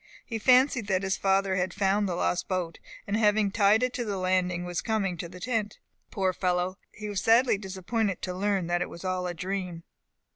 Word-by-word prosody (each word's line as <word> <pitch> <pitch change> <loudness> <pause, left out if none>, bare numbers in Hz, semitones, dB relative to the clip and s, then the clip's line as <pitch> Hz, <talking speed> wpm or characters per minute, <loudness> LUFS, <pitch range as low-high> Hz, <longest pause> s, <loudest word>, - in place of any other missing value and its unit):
He 225 -2 -4
fancied 255 -1 +4
that 190 -1 +1
his 195 0 0
father 195 -1 +1
had 180 -1 -1
found 200 0 +1
the 175 - -1
lost 180 - 0
boat, 180 -3 -2 0.3
and 200 - -1
having 210 -2 +3
tied 210 +2 +4
it 250 0 -1
at - - 0
the 200 -2 -2
landing, 185 -1 0
was 175 -1 -2
coming 205 -5 -1
to 170 0 -6
the 180 +1 -11
tent. 220 -1 -2 0.3
Poor 190 -2 0
fellow! 180 +1 -1
he 210 - -7
was 200 -2 -2
sadly 235 +3 +4
disappointed 195 +1 -2
to 180 - -2
learn 195 -1 0
that 175 +1 0
it - - -2
was 170 - -10
all 185 -1 -1
a 175 - -4
dream. 180 -1 -4
195 Hz, 210 wpm, -28 LUFS, 180-210 Hz, 0.3 s, fancied